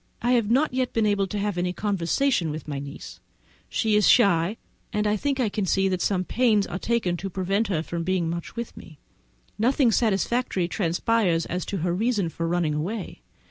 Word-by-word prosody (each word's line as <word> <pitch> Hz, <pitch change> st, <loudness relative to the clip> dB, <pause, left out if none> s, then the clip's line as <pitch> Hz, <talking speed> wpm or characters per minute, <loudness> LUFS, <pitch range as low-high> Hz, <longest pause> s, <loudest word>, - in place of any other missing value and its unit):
I 240 Hz, -, +2 dB
have 235 Hz, -4 st, +2 dB
not 275 Hz, +6 st, +3 dB, 0.2 s
been 225 Hz, -1 st, +2 dB
able 205 Hz, -2 st, +1 dB
to 205 Hz, -, -4 dB
have 200 Hz, -3 st, -1 dB
any 180 Hz, 0 st, -1 dB
conversation 200 Hz, -, 0 dB
with 150 Hz, 0 st, -6 dB
my 140 Hz, -2 st, -3 dB
niece; 140 Hz, +1 st, -9 dB, 0.5 s
she 220 Hz, -2 st, +1 dB
is 210 Hz, -, +4 dB
shy, 200 Hz, -2 st, +4 dB, 0.3 s
and 210 Hz, 0 st, 0 dB
I 210 Hz, 0 st, +2 dB
think 275 Hz, +5 st, -1 dB
I 245 Hz, -, +2 dB
can 205 Hz, -1 st, -2 dB
see 195 Hz, +2 st, +2 dB
that 185 Hz, -1 st, -1 dB
some 185 Hz, -2 st, +1 dB
pains 215 Hz, -1 st, +2 dB
are 180 Hz, -, -5 dB
taken 220 Hz, -7 st, 0 dB
to 195 Hz, +3 st, -5 dB
prevent 195 Hz, +4 st, 0 dB
her 175 Hz, -6 st, 0 dB, 0.2 s
being 175 Hz, 0 st, 0 dB
much 170 Hz, +4 st, -5 dB
with 235 Hz, -1 st, -5 dB
me. 155 Hz, -, -13 dB, 0.6 s
Nothing 250 Hz, +2 st, +3 dB
satisfactory 215 Hz, -3 st, +1 dB
transpires 175 Hz, 0 st, +1 dB
as 180 Hz, 0 st, -4 dB
to 200 Hz, -, -2 dB
her 175 Hz, -, +1 dB
reason 205 Hz, -2 st, 0 dB
for 165 Hz, +1 st, -3 dB
running 170 Hz, -3 st, 0 dB
away. 175 Hz, -, -4 dB
195 Hz, 190 wpm, -25 LUFS, 175-225 Hz, 0.6 s, is